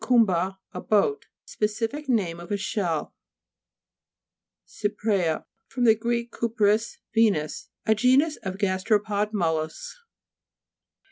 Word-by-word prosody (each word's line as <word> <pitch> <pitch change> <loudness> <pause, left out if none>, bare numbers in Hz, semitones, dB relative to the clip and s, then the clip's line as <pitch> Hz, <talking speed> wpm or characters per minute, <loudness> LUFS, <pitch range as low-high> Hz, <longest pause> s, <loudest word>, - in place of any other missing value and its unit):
kumba, 195 -6 +3
a - - -6
boat, 220 - +1 0.2
specific 225 +7 -2
name 185 -9 +1
of 175 - -10
a 205 - +1
shell. 190 -5 -2 1.5
CY'PREA 205 -6 -1 0.2
fr. - - -9
gr. 235 +2 -1 0.2
kupris, 220 -1 +1 0.2
Venus. 205 -10 +1 0.2
A 220 - +4
genus 260 +7 +3
of 190 -1 -5
gasteropod 205 +2 0
mollusks. 160 - -2
210 Hz, 95 wpm, -25 LUFS, 185-230 Hz, 1.5 s, A